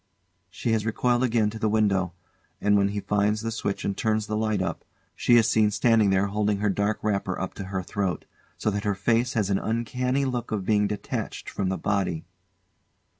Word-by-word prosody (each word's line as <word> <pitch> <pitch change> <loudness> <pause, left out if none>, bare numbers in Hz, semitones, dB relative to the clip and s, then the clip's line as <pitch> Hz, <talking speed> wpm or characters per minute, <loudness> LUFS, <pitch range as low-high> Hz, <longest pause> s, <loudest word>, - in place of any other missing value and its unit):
She 95 +5 -2
has 110 -1 +1
recoiled 120 +2 +1
again 115 -4 +2
to 110 - -7
the 110 - +1
window; 100 -4 +1 0.5
and 105 0 +3
when 100 -1 +4
he 100 0 -3
finds 105 +2 +1
the 115 0 -3
switch 105 -3 -3
and 100 - -1
turns 110 -1 0
the 105 - -3
light 110 -1 0
up, 95 -3 -3 0.3
she 120 - +4
is 115 -1 +5
seen 110 -2 +3
standing 110 0 +3
there 95 +1 +3
holding 105 0 0
her 105 0 +1
dark 100 +2 0
wrapper 100 -3 -1
up 95 - -3
to 100 - -6
her 95 -1 -3
throat, 95 -1 -2 0.3
so 110 - 0
that 100 0 -2
her 105 -1 0
face 115 +5 +1
has 105 -4 0
an 95 - +2
uncanny 125 +4 -1
look 125 -3 -3
of 100 -4 -2
being 105 0 +3
detached 105 -1 -4
from 95 -2 -1
the 95 - -1
body. 95 -5 -1
105 Hz, 205 wpm, -26 LUFS, 100-110 Hz, 0.5 s, is